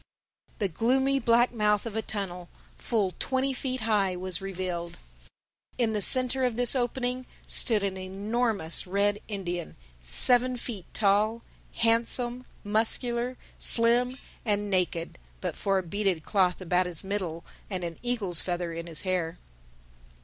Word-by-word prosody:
The 200 - 0
gloomy 265 +9 +1
black 240 0 +3
mouth 210 -2 +1
of 225 -2 -6
a 220 - 0
tunnel, 180 -5 -5 0.3
full 205 -6 -1
twenty 265 0 0
feet 260 -1 -3
high, 205 -4 +1
was 185 -1 -2
revealed. 180 -3 -4 0.8
In 230 -3 +1
the 210 - -1
centre 255 +4 +3
of 250 -3 +1
this 245 +2 +6
opening 250 0 -1 0.2
stood 220 -4 +2
an 195 -1 -2
enormous 195 -1 -2
red 200 +2 +1
Indian, 175 -5 -4 0.3
seven 245 - +4
feet 225 -6 -6
tall, 215 +3 +1 0.3
handsome, 240 +2 +2 0.2
muscular, 235 +3 +1 0.2
slim 245 +2 +5 0.3
and 205 -2 0
naked—but 165 - -2
for 195 -1 0
a 190 - -1
beaded 190 -2 -1
cloth 185 -3 +1
about 180 0 +1
his 170 -3 -7
middle 185 -4 -3 0.2
and 185 -3 -3
an 170 -1 -5
eagle's 215 -9 -1
feather 175 -2 -3
in 165 +1 -6
his 165 -2 -5
hair. 180 -3 -2
205 Hz, 135 wpm, -27 LUFS, 180-240 Hz, 0.8 s, this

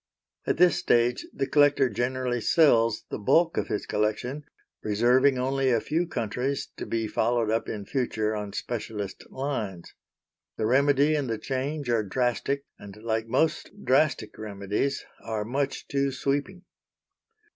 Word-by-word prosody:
At - - +1
this 175 -1 +5
stage 120 +1 +2
the 135 - -2
collector 145 -1 +4
generally 125 +1 -1
sells 115 -7 +4
the - - -3
bulk 165 +11 +3
of - - -1
his 105 - -2
collection, 120 +7 -2 0.4
reserving 125 +6 +3
only 135 +1 +1
a 120 -2 +3
few 165 +8 -1
countries 125 +1 -2
to - - -5
be 115 -1 -1
followed 115 0 +1
up 115 +1 -1
in 105 -2 -5
future 110 -5 -1
on 105 -1 -4
specialist 105 -4 -5
lines. 115 -10 -4 0.6
The 110 - 0
remedy 140 +4 +4
and 145 -5 -1
the 115 - -1
change 140 +4 -3
are 115 -2 +3
drastic, 125 +5 -1
and, 100 0 -11
like 110 0 -1
most 155 +6 +1 0.2
drastic 130 -5 +2
remedies, 105 +5 -2 0.2
are 110 -2 -3
much 135 +4 -2
too 140 0 0
sweeping. 145 +8 -2
125 Hz, 145 wpm, -27 LUFS, 110-140 Hz, 0.6 s, this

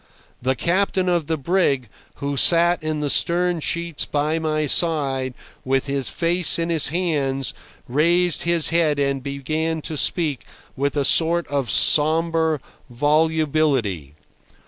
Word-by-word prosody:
The 130 +2 0
captain 185 +4 0
of 175 -4 0
the 160 - -1
brig, 140 -5 0 0.3
who 140 0 -4
sat 170 +4 +3
in 155 -1 -3
the 145 - -1
stern 175 0 +1
sheets 170 0 -1
by 150 +2 -1
my 155 -1 -1
side 135 -5 +1 0.3
with 135 +1 0
his 140 -2 -2
face 175 0 +1
in 165 0 -2
his 160 -3 +2
hands, 140 -6 -1 0.3
raised 170 +6 +2
his 170 -2 +1
head 160 -3 +2
and 140 -1 -1
began 155 +4 -3
to 160 - -5
speak 150 -2 +1 0.3
with 140 +2 -2
a 140 - +2
sort 170 +4 +2
of 140 -4 -2
sombre 160 0 +2 0.3
volubility. 145 - 0
155 Hz, 135 wpm, -21 LUFS, 140-170 Hz, 0.3 s, sat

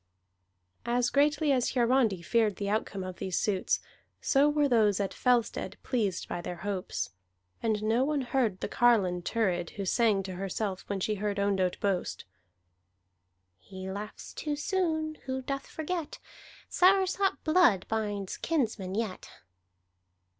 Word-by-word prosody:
As 245 0 +1
greatly 295 +1 +3
as 255 -1 +1
Hiarandi 235 -7 +2
feared 220 0 +2
the 200 0 -2
outcome 205 -2 -2
of 185 -1 -6
these 185 -2 -2
suits, 195 -3 +1 0.4
so 285 +1 +3
were 295 -1 +2
those 215 -6 +3
at 200 -1 -1
Fellstead 245 -2 +1
pleased 210 -8 -1
by 175 - -4
their 175 - -5
hopes. 190 - -3 0.5
And 215 -2 0
no 225 +4 +2
one 290 0 0
heard 240 -6 0
the - - -1
carline 200 -7 +3
Thurid, 175 -4 0
who 200 - -3
sang 210 -1 +2
to 190 0 -6
herself 195 0 -3
when 200 -1 -1
she 215 +3 0
heard 205 -1 -1
Ondott 195 -2 +1
boast: 195 -3 -1 1.3
"He 190 - -8
laughs 210 +2 -7
too 300 -1 -3
soon 315 -2 -1
Who 260 0 -2
doth 275 +1 -4
forget, 320 0 -4 0.5
Soursop 380 -1 +3
blood 310 - +4
Binds 205 -3 -2
kinsmen 220 - -1
yet." 215 -4 -3
220 Hz, 140 wpm, -29 LUFS, 195-275 Hz, 1.3 s, blood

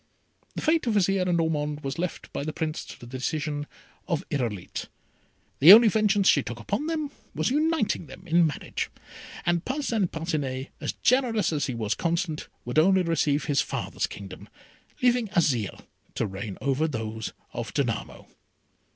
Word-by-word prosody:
The - - -4
fate 315 -4 +2
of 225 - +1
Azire 195 -1 +2
and 175 -1 +2
of - - +4
Ormond 150 -2 -1
was 135 +2 -4
left 180 0 -4
by - - -2
the 155 - -3
Prince 155 0 -3
to - - -11
the - - -10
decision 145 +4 -3 0.4
of 170 -4 -1
Irolite. 115 -10 -3 0.7
The 155 +7 +10
only 225 +1 +9
vengeance 205 -2 +3
she 145 - +6
took 120 -2 -6
upon 205 - -2
them 310 -3 -2 0.2
was - - 0
uniting 300 - +1
them 135 - -12
in 170 0 +4
marriage, 145 - -4 0.6
and 175 0 +1
Parcin 250 -7 0
Parcinet, 145 -6 -3
as - - -2
generous 230 -8 +3
as 145 -2 0
he 130 - -3
was 110 -2 0
constant, 165 -2 -1 0.2
would 125 +5 +2
only 190 +3 +5
receive 155 -3 +1
his 145 -3 +2
father's - - -2
kingdom, 100 +1 -10 0.5
leaving 245 -2 +3
Azire 125 - +1 0.3
to - - 0
reign 95 0 -6
over 140 +4 +1
those 110 -5 -4 0.2
of - - -4
Danamo. - - -2
160 Hz, 165 wpm, -26 LUFS, 135-200 Hz, 0.7 s, The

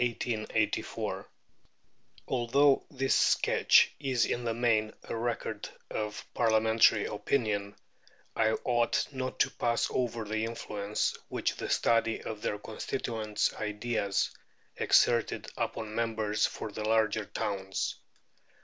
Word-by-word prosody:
Although 135 +3 +3
this 135 -1 0
sketch - - +4
is 130 -4 +1
in 120 0 -2
the 115 - 0
main 110 -2 +2
a - - -5
record 115 0 -3 0.2
of 105 0 -4
Parliamentary 110 -1 +4
opinion, 105 -3 -1 0.6
I 110 0 +3
ought 120 -2 +2
not 130 -1 -4
to - - +3
pass 120 -1 0
over 120 -3 -1
the 110 +1 -2
influence 105 -2 -2
which - - -1
the - - -4
study 115 -1 +2
of 110 -1 -6
their 105 - -1
constituents' 110 0 -2
ideas 105 -1 -1 0.4
exerted 115 -1 +3
upon 110 -1 -3
members 110 -2 0
for 110 - -6
the 105 - -5
larger 110 -1 +2
towns. 95 -1 -3
110 Hz, 110 wpm, -30 LUFS, 105-120 Hz, 0.6 s, sketch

